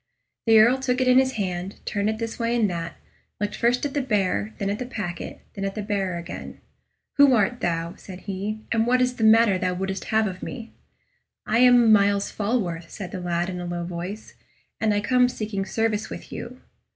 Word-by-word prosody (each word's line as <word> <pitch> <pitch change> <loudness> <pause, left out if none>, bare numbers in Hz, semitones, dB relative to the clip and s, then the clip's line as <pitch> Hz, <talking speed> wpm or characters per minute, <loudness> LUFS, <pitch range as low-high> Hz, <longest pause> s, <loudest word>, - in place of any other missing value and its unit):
The 225 0 +7
Earl 235 +5 +6
took 255 -1 0
it 255 - +1
in 255 +1 +7
his 265 0 +1
hand, 185 -2 -3
turned 205 +1 0
it 220 - -2
this 225 0 -5
way 230 0 0
and 225 -3 +3
that, 170 0 -4 0.4
looked 205 +1 -2
first 245 +3 +1
at 280 - -3
the 285 - 0
bearer, 210 -3 0
then 200 -1 -1
at 205 - -3
the 250 - -3
packet, 190 -9 -6
and 195 - -4
then - - 0
at 195 - -3
the 210 - -3
bearer 195 -4 -1
again. 170 - -8 0.6
"Who 280 -3 +7
art 235 +3 +1
thou?" 165 0 -1
said 185 -1 -10
he; 205 +2 -4
"and 230 0 +2
what 250 +1 +3
is 250 0 +1
the 225 - -2
matter 220 -3 +5
thou 180 0 -1
wouldst 190 +1 -3
have 220 0 +2
of 185 -3 -5
me?" 230 -2 -7 0.7
"I 225 +2 +1
am 245 -2 +6
Myles 200 -1 +3
Falworth," 195 -7 -2
said 190 -4 -7
the 185 - -5
lad, 175 0 -1
in 180 -1 -4
a - - -5
low 175 0 -3
voice; 180 +5 -6 0.5
"and 220 -1 +2
I 205 0 +1
come 250 +3 +3
seeking 210 -5 -4
service 220 +1 -1
with - - -9
you." 250 +2 -7
210 Hz, 215 wpm, -24 LUFS, 185-235 Hz, 0.7 s, The